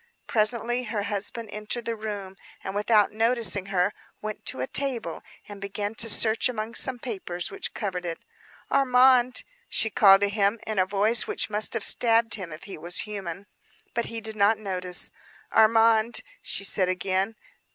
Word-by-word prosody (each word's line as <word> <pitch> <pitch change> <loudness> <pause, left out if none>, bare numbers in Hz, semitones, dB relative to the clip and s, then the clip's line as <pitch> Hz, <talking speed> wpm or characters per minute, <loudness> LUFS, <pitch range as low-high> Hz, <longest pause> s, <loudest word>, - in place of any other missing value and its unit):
Presently 235 +3 +2
her 210 -2 -3
husband 210 +2 -3
entered 215 +3 -4
the 230 - -2
room, 205 -3 -6 0.3
and 190 - -5
without 210 0 +2
noticing 220 -4 +1
her, 190 +1 0 0.3
went 215 0 -7
to - - 0
a 130 - -1
table 265 - -1 0.3
and 205 -1 -10
began 205 +1 -4
to 225 0 -1
search 220 +3 +1
among 225 -1 -5
some 255 +1 +1
papers 190 -7 -4
which 395 -1 -4
covered 185 -4 -4
it. 170 -2 -4 0.5
"Armand," 255 -2 +4 0.3
she 220 - 0
called 195 -2 +6
to 205 - +2
him, 205 +1 0
in 215 -3 -2
a 185 - +2
voice 210 +4 +2
which - - -1
must 215 +2 +1
have 225 - -2
stabbed 230 -1 +3
him, 185 -6 -3
if 155 - -10
he 195 -5 -9
was 175 +3 -1
human. 195 -3 -7 0.5
But 235 - -1
he 230 -1 -6
did 220 0 -3
not 210 +1 +3
notice. 185 -3 +2 0.4
"Armand," 225 +1 +4 0.2
she 195 - 0
said 190 -2 +3
again. 190 +3 -1
215 Hz, 170 wpm, -25 LUFS, 195-230 Hz, 0.5 s, called